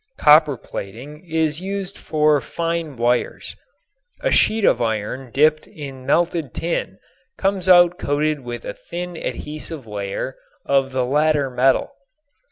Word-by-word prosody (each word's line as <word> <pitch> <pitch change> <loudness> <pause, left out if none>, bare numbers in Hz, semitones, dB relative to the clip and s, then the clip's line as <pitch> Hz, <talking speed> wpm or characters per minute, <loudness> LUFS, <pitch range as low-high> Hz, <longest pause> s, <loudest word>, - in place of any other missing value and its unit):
Copper 150 -2 +6
plating 125 - -8
is 160 0 0
used 195 0 -4
for 150 -2 +2
fine 165 -3 -3
wires. 120 +1 -1 0.7
A - - 0
sheet 220 -2 +3
of - - +3
iron 115 +3 -2
dipped 155 +3 +3
in 135 -4 -9
melted 165 -3 +1
tin 170 0 -2 0.4
comes 190 -1 0
out 175 -1 +6
coated 150 +1 0
with 120 -2 -7
a - - -4
thin 175 +1 -7
adhesive 155 -2 -6
layer 105 +4 -4 0.3
of 135 -1 +2
the 130 -1 0
latter 145 0 +2
metal. 130 - +2
150 Hz, 130 wpm, -21 LUFS, 130-165 Hz, 0.7 s, Copper